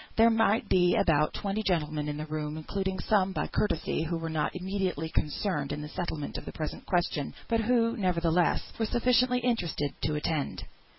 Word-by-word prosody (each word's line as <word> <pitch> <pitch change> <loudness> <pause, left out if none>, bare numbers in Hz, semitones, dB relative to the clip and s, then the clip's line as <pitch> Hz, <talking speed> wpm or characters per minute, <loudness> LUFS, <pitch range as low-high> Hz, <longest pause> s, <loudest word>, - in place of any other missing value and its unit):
There 230 +1 +6
might 225 -1 +2
be 180 -1 +4
about 150 -2 +3
twenty 200 +2 -2
gentlemen 155 -6 0
in 145 - -3
the 155 - -4
room, 155 0 -4
including 190 +4 -2
some 190 0 +2
by - - -1
courtesy, 165 -6 0
who 165 +1 -1
were 165 0 -4
not 155 +2 -1
immediately 185 -4 -2
concerned 150 -2 -1
in 145 +1 -3
the 150 - -7
settlement 160 -4 -4
of - - -13
the - - -6
present 155 -1 -5
question; 170 -5 0
but 230 -1 +2
who, 230 0 +2
nevertheless, 175 -3 +2 0.2
were 225 - +1
sufficiently 250 +1 +3
interested 175 - 0
to 150 - 0
attend. 150 -1 -2
175 Hz, 180 wpm, -29 LUFS, 155-210 Hz, 0.2 s, There